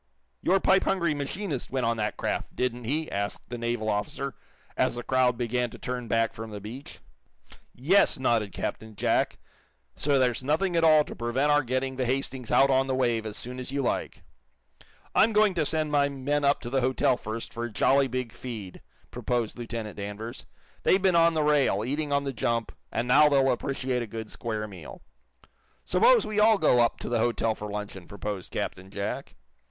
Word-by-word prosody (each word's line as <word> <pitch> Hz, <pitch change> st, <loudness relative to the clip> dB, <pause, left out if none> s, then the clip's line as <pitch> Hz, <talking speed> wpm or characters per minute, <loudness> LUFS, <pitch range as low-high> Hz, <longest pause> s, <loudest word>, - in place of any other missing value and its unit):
"Your 195 Hz, +2 st, +3 dB
pipe 190 Hz, +1 st, +3 dB
hungry 170 Hz, -5 st, +1 dB
machinist 145 Hz, 0 st, -4 dB
went 130 Hz, -2 st, -1 dB
on 115 Hz, 0 st, +1 dB
that 105 Hz, -1 st, -2 dB
craft, -, -, -3 dB
didn't 125 Hz, -1 st, -2 dB
he!" 155 Hz, +6 st, -2 dB
asked 100 Hz, 0 st, -4 dB
the 120 Hz, -, -5 dB
naval 115 Hz, -2 st, -2 dB
officer, 110 Hz, +6 st, -2 dB, 0.4 s
as -, -, +1 dB
the 120 Hz, -, -5 dB
crowd 130 Hz, -2 st, +2 dB
began 120 Hz, 0 st, -1 dB
to -, -, -11 dB
turn 125 Hz, -1 st, -4 dB
back 115 Hz, 0 st, +1 dB
from 115 Hz, 0 st, -7 dB
the 105 Hz, -1 st, -7 dB
beach. 115 Hz, +7 st, -9 dB, 0.7 s
"Yes," 175 Hz, +11 st, +3 dB
nodded 115 Hz, -6 st, +1 dB
Captain 110 Hz, +3 st, -5 dB
Jack. -, -, +1 dB, 0.6 s
"So 145 Hz, -1 st, +1 dB
there's 125 Hz, -1 st, +1 dB
nothing 165 Hz, +6 st, +1 dB
at 165 Hz, -, +3 dB
all 155 Hz, -2 st, +6 dB
to -, -, -9 dB
prevent 125 Hz, +5 st, 0 dB
our 145 Hz, 0 st, +5 dB
getting 130 Hz, +1 st, -2 dB
the 130 Hz, -2 st, 0 dB
'Hastings' 130 Hz, -1 st, -2 dB
out 135 Hz, 0 st, +5 dB
on 135 Hz, 0 st, +3 dB
the 130 Hz, -, 0 dB
wave 120 Hz, -4 st, 0 dB
as 105 Hz, -, -6 dB
soon 125 Hz, +1 st, -6 dB
as 130 Hz, +1 st, -5 dB
you 140 Hz, 0 st, -1 dB
like." -, -, -2 dB, 0.9 s
"I'm 225 Hz, +1 st, +4 dB
going 210 Hz, -2 st, +4 dB
to 160 Hz, -4 st, 0 dB
send 155 Hz, -2 st, 0 dB
my 140 Hz, -1 st, +3 dB
men 140 Hz, +2 st, -1 dB
up 140 Hz, 0 st, +3 dB
to 120 Hz, -, -6 dB
the 135 Hz, 0 st, +2 dB
hotel, 130 Hz, 0 st, +2 dB
first, 115 Hz, -1 st, -6 dB
for 120 Hz, 0 st, -3 dB
a 120 Hz, -, -6 dB
jolly 135 Hz, +6 st, +3 dB
big 125 Hz, -3 st, -4 dB
feed," 105 Hz, -3 st, -8 dB, 0.3 s
proposed 120 Hz, -3 st, -2 dB
Lieutenant 115 Hz, -3 st, -6 dB
Danvers. 105 Hz, +3 st, -6 dB, 0.3 s
"They've 190 Hz, -, +4 dB
been 190 Hz, -2 st, +3 dB
on 165 Hz, 0 st, +5 dB
the 155 Hz, -, +2 dB
rail, 140 Hz, -8 st, +2 dB
eating 145 Hz, +3 st, -2 dB
on 140 Hz, 0 st, +2 dB
the 135 Hz, -1 st, -3 dB
jump, 115 Hz, -1 st, -1 dB, 0.2 s
and 115 Hz, +2 st, -1 dB
now 150 Hz, +4 st, +6 dB
they'll 135 Hz, -2 st, +4 dB
appreciate 130 Hz, 0 st, -2 dB
a 120 Hz, -, -4 dB
good 110 Hz, +1 st, -7 dB
square 110 Hz, -2 st, -4 dB
meal." 95 Hz, -, -11 dB, 0.8 s
"Suppose 485 Hz, 0 st, +4 dB
we 210 Hz, 0 st, -1 dB
all 215 Hz, 0 st, +6 dB
go 125 Hz, -, +4 dB
up 120 Hz, -1 st, +3 dB
to -, -, -5 dB
the 120 Hz, -1 st, +1 dB
hotel 115 Hz, -1 st, +1 dB
for 105 Hz, -1 st, -7 dB
luncheon!" 100 Hz, -3 st, -6 dB
proposed 100 Hz, -1 st, -6 dB
Captain 95 Hz, +1 st, -4 dB
Jack. 100 Hz, +1 st, -5 dB
125 Hz, 195 wpm, -27 LUFS, 115-145 Hz, 0.9 s, all